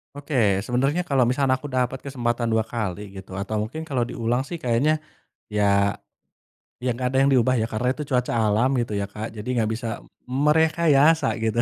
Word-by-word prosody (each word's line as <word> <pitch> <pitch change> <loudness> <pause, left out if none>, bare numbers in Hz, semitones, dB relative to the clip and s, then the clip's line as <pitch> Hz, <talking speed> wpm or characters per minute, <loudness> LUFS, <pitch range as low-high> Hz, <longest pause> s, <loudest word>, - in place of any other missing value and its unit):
Oke, 145 +1 -7 0.3
sebenarnya 135 +8 0
kalau 135 -5 +2
misalnya 130 0 +2
aku 145 +2 -8
dapat 130 0 -1
kesempatan 120 -3 -2
2 110 0 +1
kali 105 -3 -4
gitu, 95 0 -10
atau 105 +2 -2
mungkin 155 +9 -5
kalau 130 -5 -1
diulang 120 +2 -1
sih 170 +5 -6
kayaknya 135 +5 +1 0.6
ya, 105 -1 +2 1.2
ya 130 - +1
nggak 125 +2 -2
ada 130 - -1
yang 140 - +3
diubah, 130 0 +3
ya. 110 - 0
Karena 120 +3 -1
itu 150 - -4
cuaca 125 -1 +1
alam 110 +5 +2
gitu 115 -2 -2
ya, 100 - -1
Kak, 105 +2 -6
jadi 105 - -7
nggak 110 -2 +1
bisa 115 0 -4 0.4
merekayasa, 155 +2 +3 0.2
gitu. 115 +1 0
125 Hz, 180 wpm, -24 LUFS, 110-140 Hz, 1.2 s, yang